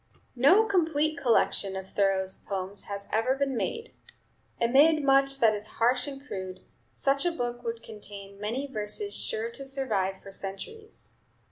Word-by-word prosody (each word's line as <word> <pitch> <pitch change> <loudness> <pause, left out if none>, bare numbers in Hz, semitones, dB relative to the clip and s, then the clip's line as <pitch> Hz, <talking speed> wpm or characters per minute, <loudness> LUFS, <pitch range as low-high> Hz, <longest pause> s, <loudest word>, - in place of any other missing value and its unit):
No 335 - +6
complete 315 -6 +1
collection 205 -6 +2
of 190 0 -7
Thoreau's 190 -1 +1
poems 195 0 -5
has 200 0 -5
ever 225 +5 +2
been 275 -1 -1
made. 460 - -3 0.7
Amid 285 +6 +5
much 275 0 +4
that 225 -4 +5
is 210 0 -5
harsh 250 +3 +2
and 275 0 -7
crude, 185 -6 -6 0.3
such 275 +1 +1
a 350 - +2
book 240 -6 -3
would 230 -1 -4
contain 200 -2 -9
many 235 +7 -2
verses 270 - 0
sure 455 0 -3
to 275 - -7
survive 220 -9 -1
for 195 - -10
centuries. 310 - -7
245 Hz, 150 wpm, -28 LUFS, 200-285 Hz, 0.7 s, No